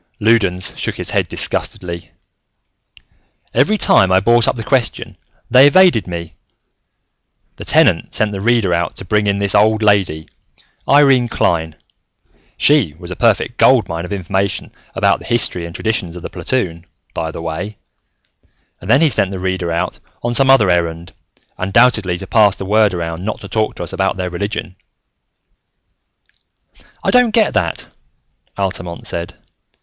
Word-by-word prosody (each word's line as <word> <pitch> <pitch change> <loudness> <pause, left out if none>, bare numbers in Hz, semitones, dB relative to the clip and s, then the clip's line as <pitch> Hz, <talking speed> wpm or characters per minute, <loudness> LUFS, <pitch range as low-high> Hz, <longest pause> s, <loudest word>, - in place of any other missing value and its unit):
Loudons 105 -5 +1
shook - - -3
his - - -3
head - - 0
disgustedly. 85 -2 -3 1.4
"Every 170 - +2
time 95 - +4
I 95 - +5
brought 120 +4 +3
up - - +1
the 115 - -5
question, 120 +3 -1 0.4
they 130 +3 +7
evaded 175 - +4
me. 85 -2 -6 1.2
The - - -9
Tenant - - +2
sent 105 -1 0
the 100 -1 -5
Reader 115 -4 +1
out 85 -2 -2
to - - -8
bring 105 +2 0
in 100 0 +1
this 100 -1 0
old 110 +1 +3
lady, 95 -7 +1 0.6
Irene 135 -4 +4
Klein 80 -8 -1 0.8
she 140 - +2
was 85 0 -10
a - - -4
perfect 115 0 +1
gold 125 -7 +4
mine 85 -1 -5
of 90 - -8
information 95 0 -2 0.2
about - - +2
the - - -13
history 90 -7 0
and 85 - -11
traditions 105 -6 -2
of 90 - -9
the - - -7
platoon, 85 -10 -3 0.3
by 80 - -3
the 80 - -8
way 90 +6 -5 1.0
and 95 - -10
then 135 +6 +4
he 160 - +4
sent 95 - +1
the 95 - -6
Reader 95 -2 -3
out 85 +2 -3 0.2
on 120 0 -1
some 135 +2 +3
other 115 -9 +5
errand, 85 -1 -2 0.5
undoubtedly 100 -2 +2
to 95 - -7
pass 105 -1 +3
the 95 - -7
word 105 -1 +2
around 85 0 -5
not 110 - -4
to - - -8
talk 110 -1 -2
to - - -6
us 85 - -8
about 95 0 -1
their 90 -1 -4
religion." 100 +1 -5 2.3
"I - - +1
don't 245 -3 +3
get 220 -3 +3
that," 85 -3 -1 0.7
Altamont 90 -3 -4
said. 85 0 -5
100 Hz, 160 wpm, -16 LUFS, 85-115 Hz, 2.3 s, they